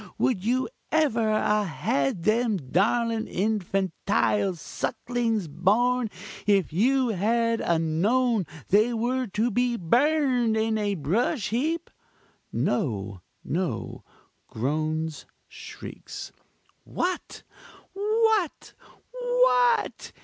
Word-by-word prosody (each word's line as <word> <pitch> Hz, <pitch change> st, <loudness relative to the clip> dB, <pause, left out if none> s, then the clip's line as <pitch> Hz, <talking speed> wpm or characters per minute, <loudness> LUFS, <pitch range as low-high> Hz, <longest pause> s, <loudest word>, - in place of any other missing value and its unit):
would 220 Hz, -8 st, +1 dB
you 250 Hz, +4 st, +1 dB, 0.2 s
ever 235 Hz, -8 st, +2 dB
a 210 Hz, 0 st, +2 dB
had 140 Hz, -1 st, -1 dB
them 220 Hz, 0 st, +2 dB
darling 220 Hz, -, 0 dB
infantile 195 Hz, -1 st, 0 dB
sucklings 225 Hz, +4 st, -2 dB
born, 220 Hz, +10 st, +2 dB, 0.4 s
if 195 Hz, -6 st, +2 dB
you 255 Hz, +7 st, +2 dB
had 230 Hz, +3 st, +1 dB
a 170 Hz, -, +1 dB
known 200 Hz, -, +1 dB, 0.2 s
they 215 Hz, +5 st, +4 dB
were 245 Hz, +2 st, -1 dB
to 220 Hz, +4 st, 0 dB
be 245 Hz, +2 st, +1 dB
burned 245 Hz, -, +2 dB
in 220 Hz, 0 st, +1 dB
a 205 Hz, -1 st, 0 dB
brush 205 Hz, -, 0 dB
heap! 310 Hz, -, -1 dB, 0.6 s
(No, 100 Hz, -, -1 dB, 0.2 s
no! 175 Hz, +3 st, -3 dB, 0.4 s
groans 155 Hz, +5 st, -2 dB, 0.2 s
shrieks.) -, -, -9 dB, 0.5 s
What! 365 Hz, 0 st, -3 dB, 0.5 s
what! 425 Hz, -2 st, +1 dB, 0.5 s
_what! -, -, +2 dB
220 Hz, 90 wpm, -26 LUFS, 185-250 Hz, 0.6 s, they